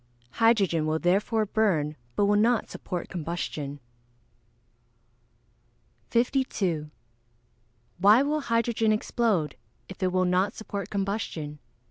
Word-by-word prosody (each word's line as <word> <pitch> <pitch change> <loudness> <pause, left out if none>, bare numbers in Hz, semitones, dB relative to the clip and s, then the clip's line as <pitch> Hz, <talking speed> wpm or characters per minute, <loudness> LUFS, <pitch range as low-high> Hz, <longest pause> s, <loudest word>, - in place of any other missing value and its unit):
Hydrogen 195 -9 +3
will 155 0 +1
therefore 200 +6 +1
burn, 185 -9 +1 0.2
but 205 - +3
will 205 +1 +3
not 225 +2 +2
support 180 -3 -5
combustion. 155 -4 -4 2.3
52. 220 - 0 1.1
_Why 215 +7 +6
will 305 +1 0
hydrogen 230 -3 +1
explode, 215 - 0 0.3
if 190 +1 -11
it 185 -1 +1
will 185 0 +2
not 180 +2 +1
support 200 -3 -5
combustion? 195 -7 -3
200 Hz, 100 wpm, -27 LUFS, 170-225 Hz, 2.3 s, Why